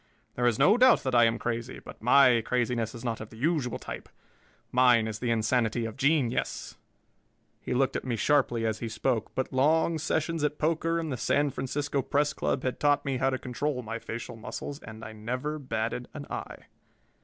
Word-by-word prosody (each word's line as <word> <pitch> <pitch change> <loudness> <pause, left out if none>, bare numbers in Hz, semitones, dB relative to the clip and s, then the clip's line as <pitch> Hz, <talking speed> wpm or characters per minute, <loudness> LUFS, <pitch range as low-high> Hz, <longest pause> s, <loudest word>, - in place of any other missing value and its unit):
There 120 0 +1
is 115 -3 +2
no 210 +4 +5
doubt 255 0 +6
that 130 -2 -1
I 120 -1 +6
am 115 0 +1
crazy, 120 +1 -3
but - - -12
my 125 0 +6
craziness 120 -1 -1
is 120 +1 -9
not 115 -2 -2
of 110 - -8
the 110 - -13
usual 140 -2 0
type. - - -8 0.6
Mine 125 -3 +5
is 110 -1 -4
the 120 - -2
insanity 115 0 +1
of 115 - -5
genius." 140 -3 0 0.9
He - - -3
looked 135 +1 +1
at - - -2
me 125 -3 -2
sharply 120 -1 +2
as 110 -1 -1
he 115 - -4
spoke, 115 0 -1
but 130 - -2
long 160 +4 +3
sessions 160 +1 -1
at 150 0 0
poker 165 +1 0
in 160 -1 -3
the 130 - -3
San 145 +4 +1
Francisco 140 +2 -2
Press 145 +2 +1
Club 130 - -1
had 130 - -2
taught 145 -1 +2
me 135 -2 -1
how 135 +1 +2
to 130 - -1
control 125 +1 -3
my 115 +1 -5
facial 115 +1 -6
muscles, 125 +5 -6
and 110 0 -10
I 110 - -8
never 125 +8 -4
batted 115 -2 -3
an 145 -1 -6
eye. - - -6
125 Hz, 200 wpm, -28 LUFS, 115-145 Hz, 0.9 s, doubt